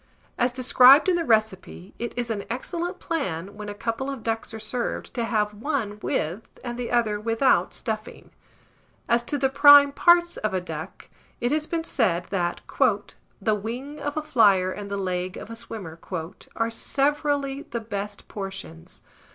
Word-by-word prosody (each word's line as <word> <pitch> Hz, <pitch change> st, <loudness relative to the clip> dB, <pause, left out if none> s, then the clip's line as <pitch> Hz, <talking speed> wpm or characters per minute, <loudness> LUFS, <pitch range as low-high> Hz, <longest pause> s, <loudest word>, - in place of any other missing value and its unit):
(As 245 Hz, +1 st, +1 dB
described 255 Hz, +3 st, +6 dB
in 365 Hz, -, +3 dB
the 340 Hz, -, 0 dB
recipe, 215 Hz, -, 0 dB
it 235 Hz, -, -3 dB
is 240 Hz, -1 st, -2 dB
an 205 Hz, -2 st, -3 dB
excellent 345 Hz, +9 st, -3 dB
plan, 200 Hz, -, -3 dB
when 210 Hz, 0 st, -7 dB
a 205 Hz, -, -6 dB
couple 230 Hz, +5 st, -3 dB
of 270 Hz, -5 st, -6 dB
ducks 225 Hz, 0 st, -2 dB
are 225 Hz, -, -6 dB
served, 225 Hz, +3 st, -3 dB
to 235 Hz, -, -1 dB
have 210 Hz, -2 st, 0 dB
one 215 Hz, -3 st, -3 dB
with, 170 Hz, +7 st, -1 dB, 0.2 s
and 240 Hz, -1 st, -4 dB
the 245 Hz, -1 st, -4 dB
other 225 Hz, -4 st, +1 dB
without 230 Hz, +4 st, +2 dB
stuffing.) -, -, -5 dB, 0.8 s
As 235 Hz, 0 st, +3 dB
to 290 Hz, -, -1 dB
the 270 Hz, -1 st, +2 dB
prime 285 Hz, +1 st, +8 dB
parts 345 Hz, +3 st, +4 dB
of 215 Hz, -3 st, -2 dB
a -, -, +2 dB
duck, 180 Hz, -, -8 dB, 0.3 s
it 240 Hz, +1 st, 0 dB
has 305 Hz, 0 st, 0 dB
been 330 Hz, -1 st, -2 dB
said 185 Hz, -, 0 dB
that 175 Hz, -3 st, -1 dB, 0.8 s
"the 215 Hz, +2 st, +1 dB
wing 245 Hz, +8 st, -5 dB
of 290 Hz, +1 st, -4 dB
a 310 Hz, -, -1 dB
flier 205 Hz, -10 st, +4 dB
and 200 Hz, +1 st, -7 dB
the 200 Hz, -, -2 dB
leg 185 Hz, -1 st, -2 dB
of -, -, -9 dB
a -, -, -6 dB
swimmer" 210 Hz, -8 st, -8 dB, 0.6 s
are 230 Hz, 0 st, 0 dB
severally 280 Hz, +2 st, 0 dB
the 235 Hz, -, -3 dB
best 205 Hz, -2 st, -6 dB
portions. 195 Hz, -, -8 dB
230 Hz, 170 wpm, -25 LUFS, 205-275 Hz, 0.8 s, prime